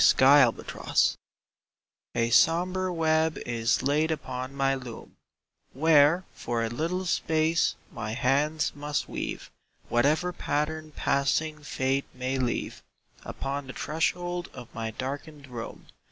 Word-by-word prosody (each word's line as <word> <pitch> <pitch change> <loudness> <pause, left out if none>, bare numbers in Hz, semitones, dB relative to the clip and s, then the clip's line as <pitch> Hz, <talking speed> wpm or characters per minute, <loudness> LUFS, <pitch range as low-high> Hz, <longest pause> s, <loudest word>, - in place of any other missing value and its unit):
Meavino 135 -3 +4 1.2
SOMBRE 180 +6 +3
web 160 -1 +2
is 115 0 0
laid 150 +3 +2
upon 130 -4 -4
my 135 0 +2
loom 125 -4 -8 0.6
Where 155 +4 +5
for 115 -1 -2
a 115 - -1
little 170 +10 -2
space 160 -1 +1 0.2
my 110 -2 -4
hands 140 +6 +1
must 145 0 -2
weave - - -5 0.4
Whatever 155 +9 +2
pattern 155 0 -2
passing 150 +3 0
Fate 135 -1 -1
may 130 +1 -2
leave 125 -2 -2 0.4
Upon 140 0 -4
the 130 - -7
threshold 175 +3 -2
of 125 -2 -10
my 115 0 -3
darkened 140 +5 -6
room. 120 -3 -8
145 Hz, 110 wpm, -27 LUFS, 130-160 Hz, 1.2 s, Where